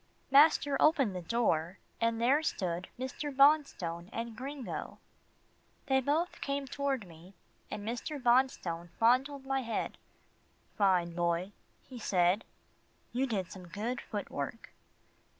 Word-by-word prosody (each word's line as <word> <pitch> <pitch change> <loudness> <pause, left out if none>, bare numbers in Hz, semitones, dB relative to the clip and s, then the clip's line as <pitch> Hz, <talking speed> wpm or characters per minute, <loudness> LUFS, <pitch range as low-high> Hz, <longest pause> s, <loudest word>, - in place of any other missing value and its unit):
Master 285 0 +6
opened 275 - +4
the 180 - -3
door, 175 -4 0 0.2
and 230 0 +1
there 265 +6 +4
stood 180 - -2
Mr. 260 +3 -4
Bonstone 270 - +3
and 230 0 -4
Gringo. 270 +2 -6 0.9
They 265 -2 +3
both 310 +7 0
came 280 0 -2
toward 270 -4 -2
me, 170 +3 -15 0.3
and 210 0 -6
Mr. 245 +6 -3
Bonstone 235 -10 +1
fondled 265 +4 +2
my 270 0 0
head. 230 -2 -3 0.8
"Fine 180 -4 +2
Boy," 170 +2 0 0.4
he 255 -2 -9
said, 185 0 +2 0.7
"you 260 +3 +1
did 195 -7 -2
some 185 -2 -10
good 225 +8 -3
foot 205 -2 -5
work." 145 +11 -5
235 Hz, 125 wpm, -32 LUFS, 185-275 Hz, 0.9 s, Master